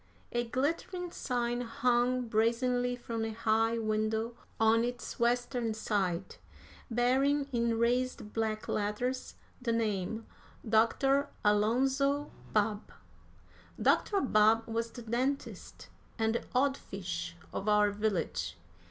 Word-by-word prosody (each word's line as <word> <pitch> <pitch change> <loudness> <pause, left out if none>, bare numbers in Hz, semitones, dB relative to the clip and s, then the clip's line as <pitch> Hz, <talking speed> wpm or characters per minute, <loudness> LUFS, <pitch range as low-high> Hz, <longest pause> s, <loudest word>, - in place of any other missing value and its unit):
A 240 0 0
glittering 335 +8 -2
sign 240 -5 -1
hung 245 +1 +1
brazenly 245 +3 +1
from 230 -2 -4
a 225 0 -3
high 225 +1 +2
window 220 +1 -1 0.2
on 225 +1 +4
its 245 0 -4
western 240 -1 +1
side, 190 -4 -1 0.5
bearing, 265 +4 +2
in 235 -2 +1
raised 240 -2 0
black 220 -1 -1
letters, 230 +5 -2 0.3
the 240 -2 0
name, 220 -1 -1 0.4
"Doctor 270 +6 +3 0.2
Alonzo 265 +7 +2 0.2
Babb." 210 0 0 0.9
Dr. 400 -2 +3
Babb 225 -2 +4
was 230 0 -2
the 240 0 -9
dentist 255 +5 -3 0.3
and 220 -1 +1
the 235 - -1
odd 270 +2 +3
fish 170 -3 -5 0.2
of 200 - -2
our 210 -1 +4
village. 190 - -2
230 Hz, 110 wpm, -31 LUFS, 215-250 Hz, 0.9 s, on